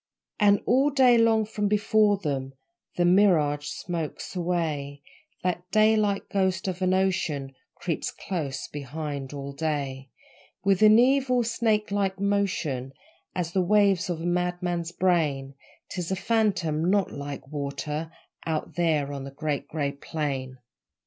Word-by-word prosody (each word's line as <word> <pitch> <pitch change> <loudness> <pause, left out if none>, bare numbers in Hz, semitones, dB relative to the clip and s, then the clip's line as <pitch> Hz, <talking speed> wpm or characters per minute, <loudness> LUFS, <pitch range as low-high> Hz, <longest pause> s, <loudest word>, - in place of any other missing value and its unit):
And 205 -1 +5
all 270 +3 +4
day 260 -3 +5
long 225 -1 +4
from 210 -1 -2
before 210 0 +3
them 135 -7 -3 0.4
The 175 - +2
mirage 165 -6 +3
smokes 170 +2 -5
away 155 -5 -2 0.4
That 180 0 -2
daylight 215 -2 +3
ghost 190 -2 0
of 185 0 -3
an 185 0 +2
ocean 160 -8 0 0.2
Creeps - - -3
close 150 -8 -4
behind 145 -1 -5
all 140 -1 -6
day 140 -3 -3 0.5
With 195 -1 +2
an 215 0 +8
evil, 255 0 +3
snake 220 -2 0
like 195 -1 0
motion, 190 -10 -1 0.4
As 175 -2 -2
the 185 - +2
waves 195 -1 +3
of 165 -2 -2
a - - -4
madman's 175 -1 -1
brain: 155 -7 0 0.4
'Tis 180 -2 -4
a 190 - 0
phantom 185 -7 +1
NOT 200 -1 +2
like 140 -1 -7
water 150 +2 -4 0.3
Out 160 -2 -3
there 155 -5 +1
on 140 -1 -5
the 135 - -6
Great 145 +1 -3
Grey 145 -3 -2
Plain. 140 -3 -4
175 Hz, 135 wpm, -26 LUFS, 145-200 Hz, 0.5 s, an